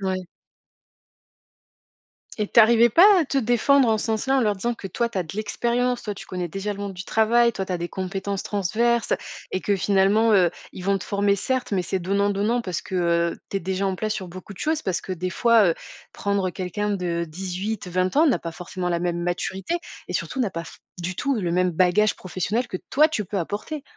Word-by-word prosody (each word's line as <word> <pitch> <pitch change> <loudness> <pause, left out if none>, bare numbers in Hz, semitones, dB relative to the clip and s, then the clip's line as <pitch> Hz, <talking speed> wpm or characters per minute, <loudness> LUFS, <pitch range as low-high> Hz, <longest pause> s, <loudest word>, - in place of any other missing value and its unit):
Ouais. 190 -1 -2 2.1
Et 210 -2 -1
tu - - +3
arrivais 235 +1 +7
pas 340 - +7
à - - +1
te 275 0 0
défendre 245 +2 +3
en 220 - +3
ce - - -3
sens-là, 225 +5 +1
en - - +3
leur 210 -4 +1
disant 235 +5 -1
que 205 - -8
toi, 235 +6 -1
tu 230 - -10
as - - +1
de 165 +3 -9
l'expérience, 240 +3 0
toi, 210 - -4
tu - - -10
connais 180 -1 -4
déjà 195 +4 -3
le 200 - -8
monde 200 -1 -4
du 185 0 -7
travail, 235 +3 +3
toi, 195 - -3
tu 185 - -5
as 180 - -1
des 170 0 -3
compétences 195 +1 -3
transverses, 225 +5 0
tu - - +3
as - - -7 0.3
et 185 - -1
que 200 +1 +1
finalement, 200 +4 +3
heu, 185 -4 +5 0.2
ils 180 - -8
vont 195 0 +2
te - - -8
former 200 0 +1
certes, 260 +6 -2
mais 190 -2 +1
c'est 190 +2 -2
donnant-donnant 200 +5 +1
parce 185 -7 -4
que, - - -8
heu, 170 -1 +1
tu 195 - 0
es - - -12
déjà 190 +2 -1
en 190 - 0
place 215 +3 -2
sur 190 - -5
beaucoup 185 +3 -10
de 185 - -14
choses. 315 0 0
Parce 185 -2 -1
que 185 - -5
des 185 +1 -3
fois, 230 0 +4
heu, - - 0 0.4
prendre 200 -2 -1
quelqu'un 200 +4 -3
de 175 -4 -1
18-20 185 - -3
ans 315 +3 +6
n'a 280 - +3
pas 165 - -5
forcément 180 +1 -5
la 170 -1 0
même 175 0 -1
maturité 190 - -2 0.3
et - - -4
surtout 265 - -2
n'a 225 -6 +1
pas 170 -1 -5
f - - -12 0.2
du 180 +1 -3
tout 275 +7 0
le 190 -8 -1
même 180 +1 +2
bagage 185 +5 +3
professionnel 190 +7 -2
que - - -3
toi 300 +3 +5
tu 220 -10 -2
peux 195 +2 -3
apporter. 210 - -4
200 Hz, 230 wpm, -24 LUFS, 185-225 Hz, 2.1 s, arrivais